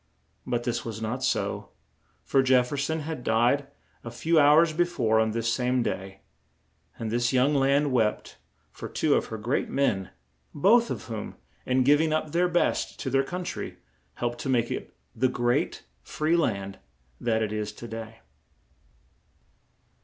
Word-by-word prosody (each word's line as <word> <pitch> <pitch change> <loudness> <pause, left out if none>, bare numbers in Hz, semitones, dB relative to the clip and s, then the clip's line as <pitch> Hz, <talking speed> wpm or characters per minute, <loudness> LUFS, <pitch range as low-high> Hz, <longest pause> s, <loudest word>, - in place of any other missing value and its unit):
But 120 -1 -1
this 120 -1 -2
was 110 -2 -6
not 110 +4 -3
so, 130 - -1 0.5
for 135 - +3
Jef 130 -1 +3
fer - - -3
son 160 +3 -1
had 150 -4 -5
died 120 +6 +2 0.4
a 120 - -6
few 160 +7 +2
hours 155 +3 +6
be 175 +3 +3
fore 115 -10 +1
on 110 0 +2
this 115 +1 -1
same 125 0 +1
day; 95 -2 -5 0.8
and 110 -1 -4
this 120 +1 +1
young 130 +3 +3
land 140 +1 +2
wept 110 -4 0 0.3
for - - -8
two - - +1
of - - +1
her 110 - -5
great 120 +6 -1
men, 95 -9 0 0.5
both 230 +10 +4
of - - -4
whom, 110 -3 -6 0.3
in 130 0 +3
giv 145 +3 +5
ing 160 -1 +1
up 155 -1 -1
their 175 +2 +2
best 175 0 0
to 130 - -3
their 135 +1 +3
coun 180 +6 -5
try, - - -5 0.4
helped 120 0 -3
to 135 - -4
make 120 -2 +1
it - - -5 0.2
the 130 +3 +2
great, 120 +7 -1 0.2
free 155 +2 0
land 100 - -1 0.4
that 110 -1 +1
it 105 -1 -3
is 105 -1 -3
to 120 - -9
day. 115 0 -8
125 Hz, 170 wpm, -27 LUFS, 115-145 Hz, 0.8 s, hours